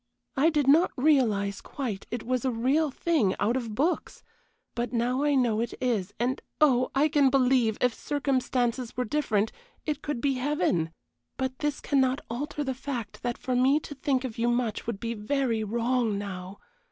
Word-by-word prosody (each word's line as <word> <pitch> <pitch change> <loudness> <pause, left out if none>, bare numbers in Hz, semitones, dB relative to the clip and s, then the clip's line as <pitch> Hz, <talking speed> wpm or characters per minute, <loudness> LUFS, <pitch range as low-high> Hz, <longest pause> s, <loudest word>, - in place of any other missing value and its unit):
I 290 +5 +4
did 300 -4 +1
not 320 +6 +6
realize, 225 -9 +2
quite, 235 -9 -5
it 240 -1 -4
was 255 0 -1
a 265 - +1
real 265 +7 +1
thing 270 - +1
out 230 +4 +1
of 230 -5 -3
books 310 +9 -1 0.5
but 240 -1 -2
now 245 +2 0
I 290 -1 +2
know 235 -5 +2
it 235 - -3
is; 215 -7 0
and 250 +2 0 0.2
oh, 255 -4 +4
I 285 +3 +4
can 285 -3 +4
believe, 255 -4 +3
if 250 -2 +2
circumstances 255 -4 -1
were 250 - 0
different, 220 -6 0 0.3
it 300 -2 -2
could 295 -5 -3
be 275 +2 +1
heaven. 255 - 0 0.5
But 260 -1 -3
this 295 -1 -1
cannot 265 -1 +1
alter 290 +4 -3
the 265 -2 -2
fact 250 -5 -5
that 240 -1 -2
for 255 - -2
me 265 +4 +4
to 290 - -8
think 270 -2 0
of 235 -4 -5
you 235 +1 +2
much 240 -3 -1
would 225 -4 -3
be 230 +1 -3
very 230 0 0
wrong 230 0 0
now. 190 -1 -6
255 Hz, 180 wpm, -27 LUFS, 230-280 Hz, 0.5 s, not